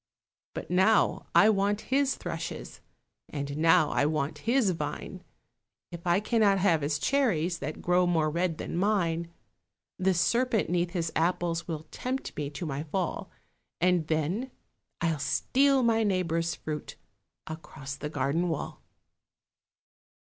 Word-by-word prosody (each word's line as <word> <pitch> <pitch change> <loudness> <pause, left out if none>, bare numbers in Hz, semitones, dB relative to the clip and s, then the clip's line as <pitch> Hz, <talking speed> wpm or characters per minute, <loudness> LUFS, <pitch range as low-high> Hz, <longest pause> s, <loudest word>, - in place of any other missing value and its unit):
But - - -6
now 190 +4 +3
I 215 +2 +7
want 205 +1 +1
his 275 0 +3
thrushes, - - -6 0.5
And 140 -1 -4
now 160 -1 +4
I 140 - +2
want 155 -1 -2
his 240 -6 +3
vine, 170 - -5 0.7
If 170 +1 -8
I 175 +2 +4
cannot 210 -2 +3
have 180 -5 +3
his 145 +1 0
cherries 180 - +1
That 150 +2 -5
grow 180 0 +3
more 160 -3 +2
red 170 0 -1
than - - -5
mine. 170 -4 0 0.7
The 185 0 +2
serpent 235 +4 +1
'neath 175 0 0
his 170 -3 -1
apples 170 0 0
Will 160 -2 -4
tempt 260 +2 -4
me 145 -1 -3
to 150 +4 -6
my 140 -2 -3
fall, 175 +3 -3 0.5
And 180 -2 +2
then—I'll 165 - -3
steal 270 - +2
my 225 -1 +3
neighbour's 170 -4 0
fruit 150 -1 -6 0.5
Across 145 -3 -7
the 150 - -5
garden 150 +5 0
wall. 160 - -4
175 Hz, 135 wpm, -28 LUFS, 155-200 Hz, 0.7 s, I